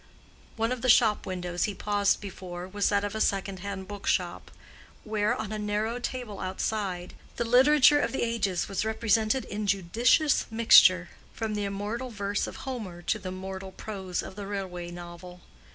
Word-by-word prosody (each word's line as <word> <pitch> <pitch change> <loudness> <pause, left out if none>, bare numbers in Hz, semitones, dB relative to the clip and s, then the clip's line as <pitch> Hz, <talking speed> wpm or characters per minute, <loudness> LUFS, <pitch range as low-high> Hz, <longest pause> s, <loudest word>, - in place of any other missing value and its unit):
One 225 +1 0
of 250 -2 -2
the 255 - 0
shop 220 -4 +4
windows 180 -1 -2
he 205 - -4
paused 205 0 +1
before 180 -2 -7
was 205 +1 0
that 200 -1 +1
of 205 - -3
a 220 - -2
second 195 -1 0
hand 195 0 -6
book 205 -1 -8
shop, 175 -2 0 0.5
where, 215 -1 0
on 215 -1 -5
a 215 - -3
narrow 210 +3 -1
table 245 -5 -5
outside, 185 -2 -3 0.2
the 235 - -1
literature 280 +4 +6
of - - 0
the - - -1
ages 205 -6 0
was 195 0 -2
represented 220 +2 +1
in 210 0 -4
judicious 225 - +2
mixture, 185 -6 +6 0.3
from 220 -1 -3
the 205 -1 -1
immortal 205 +6 -3
verse 205 -2 -2
of - - -8
Homer 210 -10 -6
to 215 - 0
the 185 - -6
mortal 190 0 -6
prose 190 -4 -4
of - - -9
the 200 -1 -6
railway 185 -4 -4
novel. 175 +1 -10
205 Hz, 175 wpm, -28 LUFS, 185-220 Hz, 0.5 s, literature